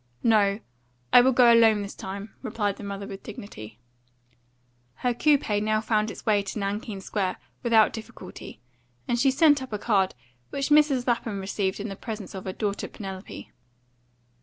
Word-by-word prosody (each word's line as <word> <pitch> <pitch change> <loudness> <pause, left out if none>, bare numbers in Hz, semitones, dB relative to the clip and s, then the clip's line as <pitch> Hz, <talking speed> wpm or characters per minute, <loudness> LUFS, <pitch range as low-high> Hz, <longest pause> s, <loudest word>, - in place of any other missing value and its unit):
"No; 210 -3 +3 0.5
I 245 - +10
will 260 +2 +4
go 240 -2 +6
alone 220 -3 +5
this 200 - -7
time," 200 +3 -7
replied 210 -5 -2
the - - -9
mother 200 0 -5
with 195 0 -8
dignity. 110 - -10 1.2
Her 245 - 0
coupe 290 +3 +2
now 215 0 +1
found 215 -1 0
its - - -9
way 210 -3 +3
to 195 +2 -6
Nankeen 200 0 -3
Square 190 -1 -2 0.2
without 225 -3 +4
difficulty, 220 - -10 0.5
and 240 - 0
she 270 +3 +4
sent 290 +1 +4
up 260 - -8
a 210 - -2
card, 200 -3 +1 0.3
which 275 0 -2
Mrs. 295 -4 +4
Lapham 230 -4 -1
received 190 0 -2
in 210 +2 -4
the 195 - -6
presence 215 -2 -7
of 190 -1 -7
her 190 - -3
daughter 205 -1 -2
Penelope. 195 -1 -8
215 Hz, 165 wpm, -26 LUFS, 200-240 Hz, 1.2 s, I